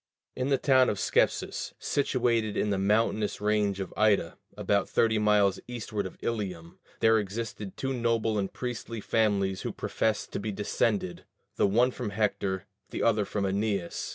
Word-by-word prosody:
In 130 +1 -1
the 135 - +3
town 130 -1 +4
of 105 - -1
Scepsis, - - 0
situated 120 -6 0
in 105 - +1
the 100 - 0
mountainous 105 +1 +1
range 105 -2 +1
of 95 - -5
Ida, 105 -2 +2 0.2
about 100 -1 +1
thirty 110 -1 +2
miles 105 -2 +3
eastward 110 -5 -4
of - - -13
Ilium, 95 -7 -4 0.2
there 110 0 +5
existed 105 -1 -5
two 135 0 -2
noble 115 -3 +1
and 95 -1 -2
priestly 120 -2 -5
families 100 -3 +1
who - - -3
professed 110 -1 -1
to - - -3
be 105 +1 -3
descended, 100 -2 -1 0.3
the - - +3
one 120 +6 +3
from 120 -3 -4
Hector, 100 -2 -1 0.2
the - - -3
other 105 -3 +3
from 100 +1 -2
Æneas. 100 -2 -1
105 Hz, 160 wpm, -28 LUFS, 100-115 Hz, 0.3 s, there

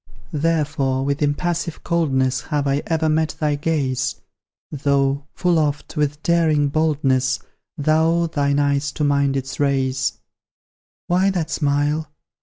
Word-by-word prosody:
Therefore, 145 -4 0
with 140 +2 -1
impassive 170 +3 -1
coldness 135 -6 +1
Have 145 -2 -1
I 140 +1 +1
ever 160 -1 +1
met 155 0 +1
thy 150 -1 +1
gaze; 135 -4 -1 0.6
Though, 140 -1 0
full 175 -2 +2
oft, 150 0 -2
with 150 0 -1
daring 160 -4 +2
boldness, 135 -4 +1 0.4
Thou 160 +3 +2
thine 145 -3 0
eyes 140 0 +1
to 150 - -2
mine 140 -1 +2
didst 135 -1 -4
raise. 135 -2 +1 0.9
Why 185 +3 +2
that 175 -5 -2
smile? 145 +1 0
145 Hz, 125 wpm, -21 LUFS, 140-160 Hz, 0.9 s, full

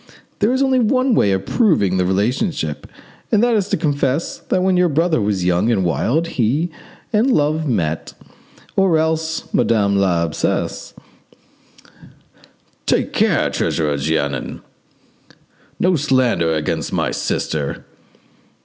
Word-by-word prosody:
There 215 - +2
is 260 +2 +1
only 265 -1 +2
one 255 +2 +2
way 100 - +3
of 95 0 -1
proving 125 - +2
the 90 -1 +1
relationship, 105 - -1 0.4
and 215 0 +3
that 240 -1 +3
is 205 -3 0
to - - +1
confess 145 -1 -1
that 185 - -1
when 190 0 +2
your 180 -1 +3
brother 160 -2 +1
was 100 -3 -1
young 90 +6 +2
and 95 -5 +1
wild 120 - 0
he 145 +4 -1 0.4
and 220 +5 +3
Love 155 - +1
met, 80 - -2 0.6
or 190 -4 +3
else 160 0 -2
Madame 105 -4 +2
l'Abbesse——." 85 -5 -1 1.9
"Take - - +1
care, - - +2
Treasurer 75 -3 -1
Jeannin! 70 -2 -2 1.2
no 185 0 +3
slander 130 - +1
against 80 -1 -2
my - - -1
sister!" 75 -3 -3
135 Hz, 125 wpm, -19 LUFS, -, 1.9 s, way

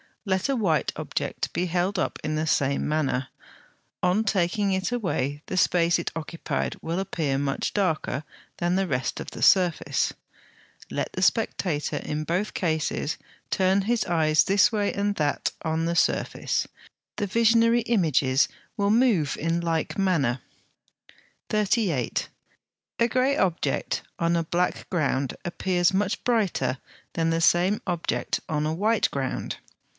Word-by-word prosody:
Let 190 +4 0
a 275 - +2
white 185 -10 +1
object - - -3
be 180 - 0
held 180 +3 0
up - - -1
in 155 - -1
the 155 +1 -1
same 140 -2 +1
manner: 140 -4 0 0.7
on 180 +4 +3
taking 200 0 +1
it 190 +3 -1
away 145 - -1
the 185 - -3
space 170 -2 +3
it 170 - -3
occupied 165 +1 -3
will 165 +3 -2
appear 155 -7 -1
much 140 -1 -1
darker 160 -7 0 0.3
than 175 +1 0
the 190 0 +1
rest 130 -4 -2
of - - -7
the - - -8
surface. 180 -4 +3 0.8
Let - - -3
the - - -2
spectator 150 -6 0
in 150 +1 -3
both 180 +7 -1
cases 160 -2 -1 0.3
turn 190 +1 +2
his 230 +2 +1
eyes 155 -3 +3
this 200 +2 +4
way 205 -2 0
and 205 0 0
that 150 -4 0
on 160 0 0
the 170 +1 0
surface, - - 0 0.5
the 205 - -1
visionary 230 +2 +4
images 155 - +2 0.3
will 200 -1 +2
move 215 - +3
in 165 +2 0
like 165 +3 -1
manner. 145 -10 +1 1.1
38. 200 - 0 0.7
A 235 - +4
grey 255 +3 +1
object 175 -3 0 0.2
on 170 0 +2
a 170 - +1
black 175 +2 -1
ground 140 -6 0
appears 175 +1 +1
much 200 +2 0
brighter 190 - +1 0.4
than 165 -1 +1
the 165 0 0
same 180 +5 +3
object 175 -3 -1
on 150 -1 0
a 155 - -1
white 210 +6 +2
ground. 135 -2 -3
175 Hz, 145 wpm, -26 LUFS, 155-200 Hz, 1.1 s, this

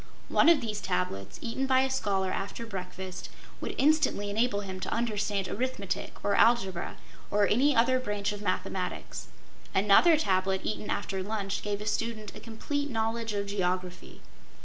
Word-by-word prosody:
One - - +5
of 325 -5 +6
these 210 -3 -3
tablets, 95 - -2
eaten 255 +3 -1
by 260 0 +5
a 265 - +1
scholar 195 -7 0
after 200 +5 -4
breakfast, 185 -3 -6 0.3
would - - -4
instantly 285 -9 +3
enable 220 -1 +1
him 190 -2 -6
to - - -4
understand 210 -4 0
arithmetic 200 -5 -3
or 200 - +2
algebra 195 -6 +2 0.3
or 205 0 +3
any 270 +6 +3
other 255 +3 +4
branch 210 -4 -1
of 205 0 -6
mathematics. 185 -1 -3 0.5
Another 210 - +6
tablet 190 -8 +1
eaten 215 - -3
after 190 -1 -2
lunch 200 0 -2
gave 205 0 -3
a - - -5
student 215 0 -2
a - - -8
complete 285 +6 -3
knowledge 225 -1 -1
of 200 -1 -1
geography. 185 -2 -3
210 Hz, 155 wpm, -29 LUFS, 190-235 Hz, 0.5 s, of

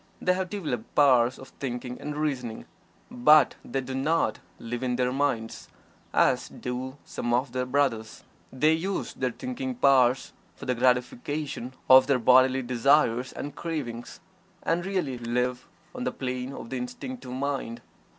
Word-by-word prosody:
They 180 - +2
have 185 0 -2
developed 150 - -4
powers 130 -4 +5
of 130 - -12
thinking 125 -1 -5
and 150 0 -5
reasoning, 130 -7 -3 0.5
but 150 +3 +5
they 135 +2 -3
do 130 0 -6
not 150 +5 +1 0.2
"live 120 +1 -5
in 125 -1 0
their 125 0 +1
minds" 130 -5 -1 0.4
as - - +2
do 130 +2 -5
some 120 0 -1
of 125 +1 -1
their 125 0 -2
brothers. 125 -5 0 0.3
They 150 +5 +3
use 185 +5 -2
their 130 - -1
thinking 255 - -5
powers 130 - +3 0.2
for - - -10
the 125 - +1
gratification 125 +2 -1
of 130 0 +8
their 140 -2 +3
bodily 130 +2 +5
desires 125 0 +2
and 145 - -7
cravings, 130 -8 -5 0.4
and 170 +1 0
really 160 -11 -2
live 125 +1 -1 0.3
on 250 - -5
the 250 - -1
plane 125 0 -4
of 135 - -9
the 130 - -2
Instinctive 125 - -6
Mind. 135 -3 -3
130 Hz, 150 wpm, -27 LUFS, 125-145 Hz, 0.5 s, of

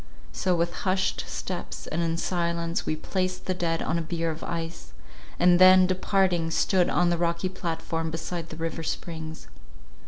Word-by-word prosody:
So, 180 - +1
with 170 0 0
hushed 190 0 0
steps - - -5
and 165 - -2
in 165 -1 0
silence, 170 -1 -1
we 155 - +1
placed 185 +3 -2
the 185 - 0
dead 165 -2 -1
on 165 +1 0
a - - -1
bier 165 0 -2
of 160 - -8
ice, 165 - -5 0.4
and 175 0 +5
then, 185 0 +8
departing, 185 -2 +1
stood 180 +2 +2
on 175 0 +3
the 170 - 0
rocky 170 +2 0
platform 165 -2 -3
beside 165 +1 -4
the - - -7
river 165 0 -3
springs. 160 0 -5
170 Hz, 165 wpm, -27 LUFS, 165-180 Hz, 0.4 s, then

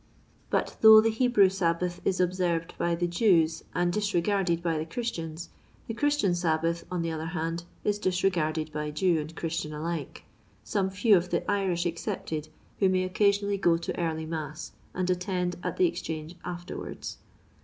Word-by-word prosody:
But - - -1
though 220 0 +10
th« 220 0 +1
Hebrew 245 -6 +5
Sabbath 175 -1 -1
is 185 - 0
observed 175 -2 0
by 170 0 +1
the 175 +1 0
Jews 170 -3 +2
and 175 0 +1
disregarded 195 -4 +1
by 165 -2 0
the 155 - -3
Christians, 165 -6 -4 0.4
the 225 - -4
Christian 290 -6 +2
Sabbath, 165 -1 0
on 180 -2 -2
the 165 - -2
other 160 0 -4
hand, 165 +2 -2 0.2
is 205 0 0
disregarded 170 -5 0
by 150 0 -3
Jew. 165 +2 +2
and 155 +2 -6
Christian 165 -2 -3
alike, 160 -2 -4 0.4
some 195 -2 0
few 205 +2 +4
of 180 0 +1
the - - 0
Irish 190 -4 0
ex 170 -1 -3
cepted, 155 -1 -4 0.3
who 195 - +4
may 185 0 +2
occasionally 200 +1 +1
go 170 -3 +4
to 170 - -4
early 160 -2 -1
mass, 155 -1 -5 0.2
and 185 0 -1
attend 180 -1 -1
at - - -3
the 370 - +4
Exchange 160 - -3
lUierwards. 175 0 -6
175 Hz, 165 wpm, -28 LUFS, 165-195 Hz, 0.4 s, though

